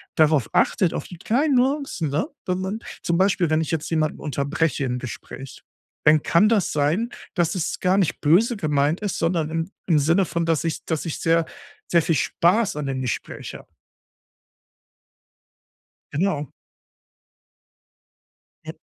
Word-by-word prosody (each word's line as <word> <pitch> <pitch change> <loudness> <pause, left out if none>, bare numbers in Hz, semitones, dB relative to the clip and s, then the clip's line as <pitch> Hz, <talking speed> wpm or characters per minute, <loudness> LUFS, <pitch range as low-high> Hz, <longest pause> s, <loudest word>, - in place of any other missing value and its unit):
darauf 155 -6 +3
achtet, 180 -5 +2
auf - - -4
die 175 - -10
kleinen 270 - +1
Nuancen, 260 - 0
ne, 155 +5 0 0.2
wenn 185 0 -1
man 195 +4 -3 0.2
zum 170 0 0
Beispiel, 185 -3 +2
wenn 155 0 +2
ich 160 - -3
jetzt 160 -2 -2
jemanden 155 -2 0
unterbreche 145 +1 -1
im 125 0 -2
Gespräch, 130 +2 -9 0.4
dann 150 0 +6
kann 205 +6 +4
das 210 -6 +2
sein, 155 +11 +1 0.3
dass 175 0 +1
es 175 - -2
gar 185 +1 +2
nicht 185 -6 0
böse 210 - +3
gemeint 150 +2 +1
ist, 205 -3 -2
sondern 165 -2 0
im 165 +4 -3 0.2
im 165 -4 +4
Sinne 170 +6 +3
von, 170 0 -2
dass 165 -2 +1
ich 160 - -3
dass 160 0 -2
ich 160 - -3
sehr 165 0 +2 0.4
sehr 170 -1 +4
viel 165 0 +1
Spaß 185 - +2
an 150 - -3
dem 130 -1 -2
Gespräch 125 - -4
habe. - - -11 2.5
Genau. 150 -3 -1 2.1
Ja. - - -6
165 Hz, 155 wpm, -23 LUFS, 150-190 Hz, 2.5 s, dann